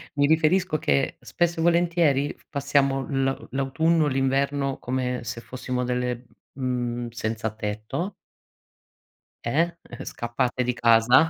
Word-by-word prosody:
mi 145 0 +4
riferisco 160 +2 +3
che 70 - +1
spesso 170 -1 -1
e - - +1
volentieri 170 -5 +3 0.2
passiamo 140 -2 +1
la 135 -1 +1 0.2
l'autunno, 150 +5 +2
l'inverno 135 +1 +1
come 125 0 -2
se 110 +2 -5
fossimo 125 0 -3
delle, 125 0 -2 0.3
mhmm, 120 -2 -2
senzatetto 110 - -3 1.3
eh, 165 +8 +1 0.3
scappate 125 +2 -1
di 125 0 0
casa 120 +5 +5
135 Hz, 105 wpm, -25 LUFS, 120-150 Hz, 1.3 s, casa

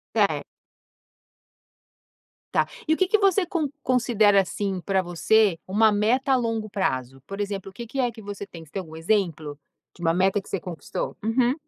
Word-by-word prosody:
Certo. - - +2 2.1
Tá - - +3 0.2
e 315 - +2
o - - +3
que 375 -1 +2
que 430 - +4
você 390 -2 +3
con 335 -5 -1 0.2
considera 220 -5 +4
assim, 195 0 -3
para 195 -1 +2
você 175 +2 +2
uma 215 +3 +4
meta 240 +6 +2
a - - +6
longo 225 -3 -1
prazo? 135 - -2
Por 195 +1 -6
exemplo, 200 -1 -3
o - - -20
que 235 +4 -8
que 270 +4 -7
é 245 -2 +1
que 220 - -12
você 200 0 -6
tem? 165 -2 -11
Você 150 - -21
tem 195 - -2
algum 160 -3 -10
exemplo 160 -5 -1 0.4
de 175 - -13
uma 165 0 +3
meta 190 +2 +2
que - - -16
você 195 - -2
conquistou? 170 -5 -5
Uhum. 245 +3 +2
205 Hz, 190 wpm, -25 LUFS, 180-240 Hz, 2.1 s, a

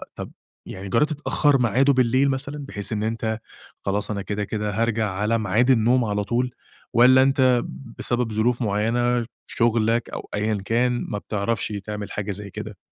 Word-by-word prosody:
طب - - -7 0.4
يعني 95 +1 -7
جرَّبت 150 +9 +2
تأخَّر 145 -1 +2
ميعاده 130 +5 +3
بالليل، 130 +2 +3
مثلًا 140 +2 -3
بحيث 105 -6 -6
إن 105 0 -1
أنت 110 0 -2 0.5
خلاص، 100 +2 -1
أنا 100 -1 -2
كده، 105 +1 -3
كده 105 0 -2
هارجع 115 -2 +1
على 105 +4 0
ميعاد 110 +5 +2
النوم 120 +1 +3
على 105 -1 -1
طول، 120 +4 -1 0.4
والَّا 130 +2 +7
أنت 130 -3 +3 0.4
بسبب 120 -2 0
ظروف 120 +3 +1
معيّنة، 115 +3 +1 0.2
شغلك 115 0 +1
أو - - -7
أيًا 105 0 0
كان، 120 +1 +1
ما 105 - -2
بتعرفش 105 +1 -2 0.2
تعمل 105 -1 -5
حاجة 105 0 -3
زي 100 +1 -6
كده؟ - - -7
115 Hz, 165 wpm, -23 LUFS, 105-125 Hz, 0.5 s, والَّا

